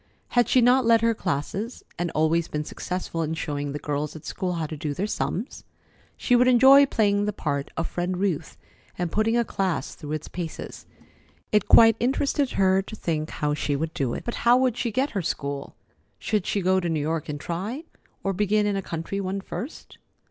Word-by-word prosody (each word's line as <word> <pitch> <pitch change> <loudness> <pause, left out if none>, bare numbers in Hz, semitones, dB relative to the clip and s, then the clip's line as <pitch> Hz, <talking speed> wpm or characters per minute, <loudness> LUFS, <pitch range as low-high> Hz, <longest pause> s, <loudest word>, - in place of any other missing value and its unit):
Had 240 -1 +2
she 255 - +5
not 250 +2 +5
led 230 -1 +4
her 230 0 +3
classes, 200 - -3 0.2
and 175 0 0
always 160 +2 +2
been 150 0 -3
successful 180 +1 -4
in 160 0 -2
showing 145 -3 -3
the 145 - -3
girls 150 +1 -3
at 155 - -10
school 180 -1 -3
how 165 -2 -2
to 155 - -6
do 150 -1 -4
their 195 - -1
sums? 215 +2 -3 0.5
She 245 - +2
would 250 +1 +5
enjoy 265 +3 +7
playing 205 -5 +2
the 210 - 0
part 140 -6 -2
of 165 - -1
Friend 180 +1 -2
Ruth, 185 -5 -2 0.4
and 175 -2 -2
putting 220 +2 +2
a 235 - +2
class 185 -10 -2
through 150 0 -7
its 155 - -4
paces. 170 -3 -7 0.6
It 210 -2 +2
quite 225 -1 +7
interested 275 +2 0
her 190 0 +3
to 200 - -9
think 155 -5 -2
how 150 0 -1
she 145 -1 -1
would 160 +3 -3
do 130 -4 -1
it. - - -6
But 235 - -4
how 240 +1 +6
would 255 -3 +2
she 240 -1 -2
get 265 +6 0
her 200 - -1
school? 140 -3 -4 0.4
Should 210 -4 -1
she 200 - 0
go 190 +1 +3
to 175 -2 -2
New 160 -2 0
York 155 +1 -2
and 145 -1 -4
try, 200 - -4 0.4
or 195 - 0
begin 210 +2 +2
in 205 -1 0
a 195 - -1
country 170 +3 -4
one 190 +1 -2
first? 195 - -8
185 Hz, 205 wpm, -25 LUFS, 155-225 Hz, 0.6 s, enjoy